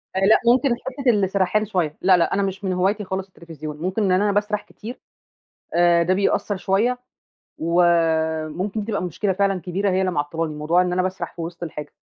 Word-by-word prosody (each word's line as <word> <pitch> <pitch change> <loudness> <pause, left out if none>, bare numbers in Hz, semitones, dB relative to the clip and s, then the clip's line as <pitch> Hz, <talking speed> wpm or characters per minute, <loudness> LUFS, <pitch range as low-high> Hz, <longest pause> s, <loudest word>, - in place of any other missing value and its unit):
آآ - - +1
لأ، 195 +3 +5
ممكن 255 +4 +4
حتّة 265 +2 -3
السَرَحان 200 -1 +1
شوية، 180 -7 -2
لا، 185 -1 +5
لأ، 170 - +1
أنا 200 - +1
مش 195 +1 -4
من 190 -1 -1
هوايتي 195 +3 0
خالص 190 0 -4
التليفزيون، 155 -5 -9
ممكن 185 +7 -2
إن 190 - +2
أنا 200 +3 +3
باسرح 210 +1 0
كتير، 230 +4 -10 0.8
آآ 170 0 +4
ده 180 +2 +2
بيأثّر 200 +1 0
شوية، 205 +7 +1 0.6
وممكن 170 +3 +1
تبقى 205 -3 -2
مشكلة 185 +3 -1
فعلًا 195 0 0
كبيرة 190 +3 -1
هي 185 0 +1
اللي 190 -1 +1
معطّلاني، 155 +1 -2
موضوع 155 +4 +2
إن 180 0 -1
أنا 185 +1 +1
باسرح 185 +1 -4
في - - -9
وِسط 170 +1 -7
الحاجة. 150 -3 -6
185 Hz, 190 wpm, -22 LUFS, 170-200 Hz, 0.8 s, لأ